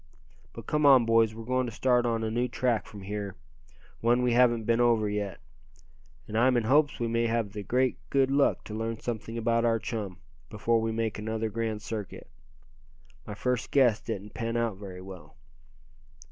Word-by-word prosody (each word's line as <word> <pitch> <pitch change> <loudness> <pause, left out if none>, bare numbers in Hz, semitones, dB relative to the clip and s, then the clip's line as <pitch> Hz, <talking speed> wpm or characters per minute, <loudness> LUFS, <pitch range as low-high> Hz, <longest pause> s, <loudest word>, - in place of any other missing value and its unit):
"But - - -9
come 150 0 0
on, 135 -4 +7
boys, 115 -1 +3
we're 115 - -7
going 130 +1 0
to - - -5
start 125 +1 +2
on 115 -1 0
a 110 - -2
new 120 +2 0
track 120 -3 -1
from 105 -3 -10
here, 100 -1 -5 0.6
one 120 +2 +2
we 125 -1 +2
haven't 120 -2 +4
been 115 +2 +2
over 115 -3 +3
yet. 105 -2 -3 0.9
I'm 120 +4 +2
in 120 - +1
hopes 145 +6 +3
we 120 - 0
may 115 0 +1
have 115 -3 -1
the 105 - -5
great 125 +5 0
good 135 -1 +2
luck 140 0 +2
to 105 - -8
learn 115 +1 -3
something 115 -1 -5
about 115 0 +1
our 115 -1 +3
chum, 105 -5 -5 0.3
before 115 +2 +1
we 110 0 -1
make 110 -1 -2
another 110 +1 -3
grand 110 -1 -3
circuit. 105 -5 -6 1.0
My 105 - -6
first 125 +1 -1
guess 120 -6 +3
didn't 105 -2 -6
pan 115 -1 -2
out 115 -4 -1
very 95 -2 -9
well." 90 -5 -11
115 Hz, 185 wpm, -28 LUFS, 105-120 Hz, 1.0 s, on